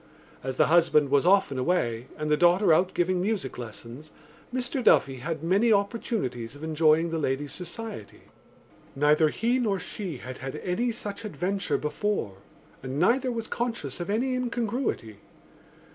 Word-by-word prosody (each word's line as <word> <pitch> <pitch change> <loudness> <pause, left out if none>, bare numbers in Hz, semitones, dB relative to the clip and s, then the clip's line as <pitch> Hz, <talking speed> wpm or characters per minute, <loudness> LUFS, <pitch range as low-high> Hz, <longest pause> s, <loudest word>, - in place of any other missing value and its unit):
As 130 0 -4
the - - +5
husband 160 -3 +4
was 140 +4 +3
often 185 -9 +3
away 125 -6 0
and 150 - -3
the 150 - +3
daughter 175 +3 +4
out 180 +3 +2
giving 180 +1 +1
music 195 - -2
lessons 120 +5 -9 0.4
Mr 255 +1 -2
Duffy 135 -10 +4
had 155 +4 -4
many 200 +7 +3
opportunities 200 - -1
of 145 - -11
enjoying 160 +1 +3
the 165 - -1
lady's 140 0 -2
society. 180 - -7 0.7
Neither 150 +2 +4
he 235 +9 0
nor 210 -5 +1
she 185 -5 -5
had 130 +1 -8
had 135 +3 -5
any 200 +10 -1
such 210 -1 -6
adventure 195 -2 -1
before 150 - -2 0.4
and 130 +1 -5
neither 250 - +2
was 230 -2 -3
conscious 230 - -3
of 175 - -4
any 245 +5 0
incongruity. 240 - -2
175 Hz, 150 wpm, -27 LUFS, 140-215 Hz, 0.7 s, the